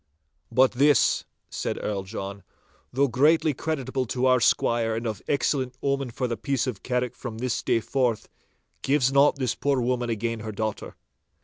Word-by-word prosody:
'But 130 Hz, +2 st, +4 dB
this,' 140 Hz, -1 st, +3 dB, 0.3 s
said -, -, -3 dB
the -, -, -7 dB
Earl 100 Hz, -2 st, -2 dB
John, 100 Hz, 0 st, -6 dB, 0.5 s
'though 140 Hz, +2 st, +2 dB
greatly 150 Hz, +5 st, +3 dB
creditable 135 Hz, -3 st, -2 dB
to 125 Hz, +4 st, -1 dB
our 130 Hz, -1 st, +5 dB
squire 115 Hz, -1 st, +2 dB
and 115 Hz, +2 st, -4 dB
of 110 Hz, -3 st, -3 dB
excellent 130 Hz, -3 st, 0 dB
omen 140 Hz, -2 st, 0 dB
for 125 Hz, +2 st, -2 dB
the 120 Hz, -, -2 dB
peace 135 Hz, +3 st, -1 dB
of 120 Hz, -6 st, -4 dB
Carrick 125 Hz, -1 st, -2 dB
from 115 Hz, -4 st, -7 dB
this 125 Hz, 0 st, -2 dB
day 115 Hz, -, +1 dB
forth, 125 Hz, -3 st, -1 dB, 0.5 s
gives 135 Hz, -2 st, +2 dB
not 140 Hz, +1 st, +5 dB
this 130 Hz, -4 st, -1 dB
poor 140 Hz, -2 st, 0 dB
woman 120 Hz, 0 st, -1 dB
again 115 Hz, 0 st, -2 dB
her 110 Hz, 0 st, -5 dB
daughter. 110 Hz, 0 st, -4 dB
125 Hz, 175 wpm, -25 LUFS, 115-135 Hz, 0.5 s, our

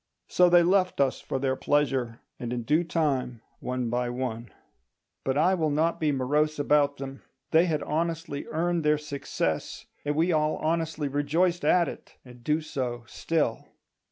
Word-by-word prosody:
So 180 Hz, -1 st, +4 dB
they 175 Hz, 0 st, +6 dB
left 185 Hz, -1 st, +2 dB
us 135 Hz, -2 st, +1 dB
for -, -, -3 dB
their 130 Hz, 0 st, 0 dB
pleasure; 130 Hz, -5 st, 0 dB, 0.2 s
and 120 Hz, -1 st, -4 dB
in 120 Hz, -1 st, -2 dB
due 155 Hz, +8 st, +2 dB
time, 135 Hz, -8 st, -1 dB, 0.2 s
one 125 Hz, -1 st, -2 dB
by 125 Hz, 0 st, 0 dB
one— 120 Hz, -2 st, -4 dB, 0.7 s
But 135 Hz, +1 st, 0 dB
I 175 Hz, +5 st, +4 dB
will 160 Hz, -4 st, +1 dB
not 160 Hz, +3 st, +1 dB
be 155 Hz, -2 st, +1 dB
morose 150 Hz, +3 st, +1 dB
about 145 Hz, 0 st, +2 dB
them; 135 Hz, 0 st, -7 dB, 0.3 s
they 165 Hz, +2 st, +5 dB
had 155 Hz, -3 st, -1 dB
honestly 165 Hz, -2 st, -2 dB
earned 170 Hz, +1 st, 0 dB
their 150 Hz, 0 st, +3 dB
success, 140 Hz, -, -3 dB, 0.2 s
and 145 Hz, 0 st, -1 dB
we 165 Hz, +4 st, +2 dB
all 155 Hz, -1 st, +2 dB
honestly 160 Hz, -2 st, -1 dB
rejoiced 160 Hz, +6 st, +1 dB
at 175 Hz, -2 st, +4 dB
it, -, -, -9 dB
and 125 Hz, -1 st, -14 dB
do 150 Hz, +4 st, +1 dB
so 125 Hz, -6 st, -4 dB
still. 150 Hz, 0 st, -1 dB
150 Hz, 165 wpm, -27 LUFS, 130-165 Hz, 0.7 s, they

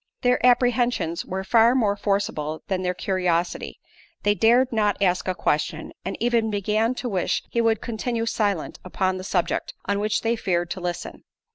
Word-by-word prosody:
Their 250 Hz, -1 st, +2 dB
apprehensions 245 Hz, -8 st, +2 dB
were 190 Hz, +1 st, -4 dB
far 230 Hz, +4 st, +4 dB
more 210 Hz, -6 st, +2 dB
forcible 195 Hz, -7 st, -2 dB
than 190 Hz, -2 st, 0 dB
their 180 Hz, 0 st, -1 dB
curiosity; 180 Hz, -2 st, -1 dB, 0.4 s
they 205 Hz, -, +4 dB
dared 240 Hz, +4 st, +4 dB
not 210 Hz, -2 st, +1 dB
ask 180 Hz, -2 st, +1 dB
a 185 Hz, -, 0 dB
question, 155 Hz, 0 st, -1 dB
and 195 Hz, -, -4 dB
even 230 Hz, -1 st, +1 dB
began 215 Hz, +4 st, 0 dB
to 250 Hz, -, -4 dB
wish 190 Hz, -6 st, -1 dB
he 235 Hz, -, +1 dB
would 225 Hz, -2 st, +2 dB
continue 230 Hz, 0 st, -2 dB
silent 205 Hz, -7 st, -1 dB
upon 185 Hz, 0 st, -1 dB
the -, -, -6 dB
subject 185 Hz, -2 st, -1 dB
on 200 Hz, +1 st, 0 dB
which 210 Hz, +1 st, 0 dB
they 230 Hz, +1 st, +1 dB
feared 175 Hz, -5 st, -1 dB
to 185 Hz, -, -4 dB
listen. 175 Hz, -1 st, -5 dB
205 Hz, 170 wpm, -24 LUFS, 185-230 Hz, 0.4 s, far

